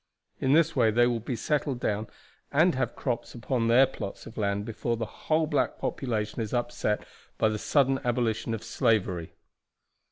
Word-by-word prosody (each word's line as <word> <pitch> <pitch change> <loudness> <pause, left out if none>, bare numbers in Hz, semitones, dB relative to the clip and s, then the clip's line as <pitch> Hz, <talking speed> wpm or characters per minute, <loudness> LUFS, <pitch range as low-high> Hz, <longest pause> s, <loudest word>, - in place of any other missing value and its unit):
In 130 - +2
this 165 +1 +4
way 120 -4 +4
they 120 +3 +4
will 120 -1 +1
be 120 +3 -4
settled 140 +1 -1
down, 110 -1 -1 0.4
and 165 +5 +4
have 130 - -1
crops 125 -2 -3
upon 120 -1 -1
their 120 +3 +7
plots 100 - -7
of 115 - -11
land, 100 -1 -1
before 115 +1 -2
the 115 - -2
whole 155 +8 0
black 150 -1 0
population 110 -3 -2
is 110 +2 -2
upset 120 -3 -1 0.3
by 110 - +3
the 105 0 -2
sudden 135 +1 +2
abolition 115 -2 0
of 110 - -8
slavery." 95 -7 0
120 Hz, 170 wpm, -28 LUFS, 110-130 Hz, 0.4 s, their